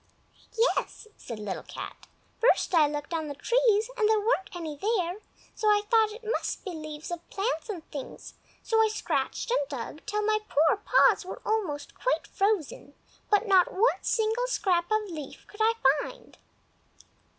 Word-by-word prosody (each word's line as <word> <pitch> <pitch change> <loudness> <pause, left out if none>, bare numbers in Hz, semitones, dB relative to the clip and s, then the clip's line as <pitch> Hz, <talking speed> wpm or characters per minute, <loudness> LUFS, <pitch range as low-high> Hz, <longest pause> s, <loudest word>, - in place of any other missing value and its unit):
"Yes," 455 -1 0
said 230 - -8
Little 210 -2 -4
Cat. - - -9 0.3
"First 470 -4 +3
I 315 -3 +6
looked 295 +2 -5
on 320 -2 -2
the 285 - -5
trees, 450 - +2
and 435 -3 +2
there 440 -1 +4
weren't 415 -2 0
any 320 -4 -5
there; 375 +1 -1 0.3
so 430 - -2
I 415 -1 +4
thought 445 -2 +5
it 455 +3 -10
must 450 +1 -2
be 380 - -3
leaves 310 -1 -7
of 345 -1 -6
plants 400 -1 -2
and 355 -6 -6
things, 280 -3 -8 0.3
so 445 -1 +3
I 440 - +5
scratched 435 +2 -2
and 290 - +1
dug 275 +2 -6
till 420 0 -1
my 430 0 +2
poor 320 +6 +3
paws 420 +1 +4
were 365 - -8
almost 360 -10 -2
quite - - -1
frozen, 385 -8 -1 0.3
but 420 +2 +3
not 375 -3 +5
one 445 +6 +2
single 445 +2 0
scrap 365 -8 +1
of 430 0 +3
a 390 -4 -8
leaf 300 -4 -8
could 415 - -9
I 445 +1 +4 0.3
find." - - -10
410 Hz, 175 wpm, -28 LUFS, 320-440 Hz, 0.3 s, I